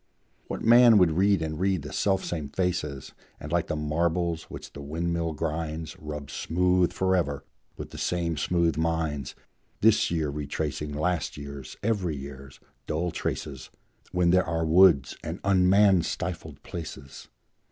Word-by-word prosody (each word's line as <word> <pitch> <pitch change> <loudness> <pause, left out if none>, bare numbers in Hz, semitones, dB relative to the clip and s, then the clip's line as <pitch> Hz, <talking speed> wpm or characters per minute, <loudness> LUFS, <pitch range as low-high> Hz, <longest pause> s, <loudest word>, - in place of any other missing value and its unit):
What - - -5
man 120 -1 +7
would 90 -4 +5
read 95 +1 +2
and 80 -1 -4
read 95 -4 +1
the 75 - -8
selfsame 90 -6 -1
faces, 75 -7 -2 0.3
And, 75 - -8
like 85 -1 +1
the - - -2
marbles 80 +2 -1
which - - -9
the 70 - -8
windmill 85 +2 -2
grinds, 80 +1 -4
Rub 75 -3 -7
smooth 90 +1 +1
forever 90 -7 0 0.3
with - - -7
the - - -8
same 85 -2 -1
smooth 85 0 +1
minds, 80 -5 -1 0.5
This 110 0 +4
year 80 -4 -1
retracing 75 +1 -3
last 80 +2 -1
year's, 70 -2 -8
every 100 -7 0
year's, 70 -1 -9 0.3
dull 85 +3 -1
traces, - - -4 0.4
When 90 -1 +2
there 90 +1 +4
are 80 -1 0
woods 80 -4 +5
and 80 +3 -5
un 95 -2 +3
man 100 -2 +5
stifled 80 -4 -5
places? 70 -5 -8
80 Hz, 145 wpm, -27 LUFS, 75-90 Hz, 0.5 s, man